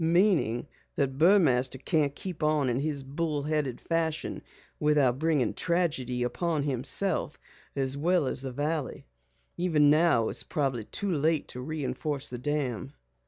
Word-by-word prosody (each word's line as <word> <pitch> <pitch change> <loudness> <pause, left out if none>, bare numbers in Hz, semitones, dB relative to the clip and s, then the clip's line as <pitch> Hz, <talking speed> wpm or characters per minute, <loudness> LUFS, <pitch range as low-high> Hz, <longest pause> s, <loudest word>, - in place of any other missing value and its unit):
"Meaning 165 - +2 0.3
that 135 -1 -1
Burmaster 150 -8 +4
can't 145 0 0
keep 180 -4 -7
on 150 -3 +2
in 120 +1 0
his 145 -1 -2
bull 145 +1 -2
headed 150 -4 -1
fashion 165 -2 -2 0.4
without 145 -4 +3
bringing 155 -6 +1
tragedy 145 -9 0
upon 155 +4 -1
himself 145 +5 0 0.4
as 135 -1 -1
well 170 +2 +2
as 130 - -1
the 135 -1 -4
valley. 145 +2 -3 0.5
Even 155 -5 +3
now 155 -8 +3
it's - - +1
probably 135 -7 -2
too 200 - -2
late 155 +1 +1
to 125 - -7
reinforce 145 0 -3
the 125 - -6
dam." 135 -2 -2
145 Hz, 140 wpm, -28 LUFS, 130-160 Hz, 0.5 s, Burmaster